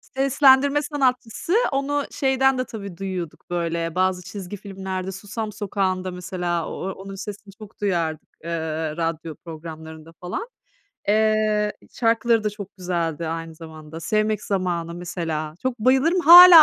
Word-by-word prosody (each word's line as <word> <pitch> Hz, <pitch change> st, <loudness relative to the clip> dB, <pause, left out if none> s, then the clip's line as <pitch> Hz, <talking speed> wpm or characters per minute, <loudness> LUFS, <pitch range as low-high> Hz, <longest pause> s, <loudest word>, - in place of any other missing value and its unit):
Seslendirme 275 Hz, +1 st, +5 dB
sanatçısı, 265 Hz, -, -1 dB, 0.2 s
onu 280 Hz, +1 st, 0 dB
şeyden 265 Hz, -2 st, +2 dB
de 255 Hz, -, -1 dB
tabii 200 Hz, -7 st, -8 dB
duyuyorduk 185 Hz, -5 st, -5 dB
böyle, 170 Hz, -1 st, -2 dB
bazı 185 Hz, -1 st, +1 dB
çizgi 190 Hz, +1 st, -7 dB
filmlerde, 190 Hz, -1 st, -5 dB
Susam 210 Hz, +3 st, -5 dB
Sokağı'nda 190 Hz, -3 st, -1 dB
mesela, 180 Hz, -2 st, -2 dB
o 190 Hz, -, -4 dB
onun 195 Hz, +1 st, -8 dB
sesini 205 Hz, 0 st, -8 dB
çok 210 Hz, 0 st, -14 dB
duyardık, 170 Hz, -6 st, -1 dB, 0.2 s
ııı, 160 Hz, -1 st, -2 dB
radyo 165 Hz, -2 st, -2 dB
programlarında 160 Hz, -1 st, -9 dB
falan. 185 Hz, -, -4 dB, 0.6 s
Eee, 215 Hz, 0 st, +3 dB, 0.2 s
şarkıları 230 Hz, -1 st, +2 dB
da 210 Hz, -, +1 dB
çok 200 Hz, -1 st, -9 dB
güzeldi 170 Hz, -3 st, -2 dB
aynı 165 Hz, 0 st, -4 dB
zamanda. 160 Hz, -1 st, -10 dB
”Sevmek 215 Hz, +4 st, 0 dB
Zamanı” 175 Hz, -4 st, -1 dB
mesela. 165 Hz, -3 st, -4 dB
Çok 255 Hz, -1 st, -1 dB
bayılırım, 265 Hz, +10 st, +3 dB
hâlâ 345 Hz, 0 st, +12 dB
190 Hz, 130 wpm, -23 LUFS, 170-225 Hz, 0.6 s, hâlâ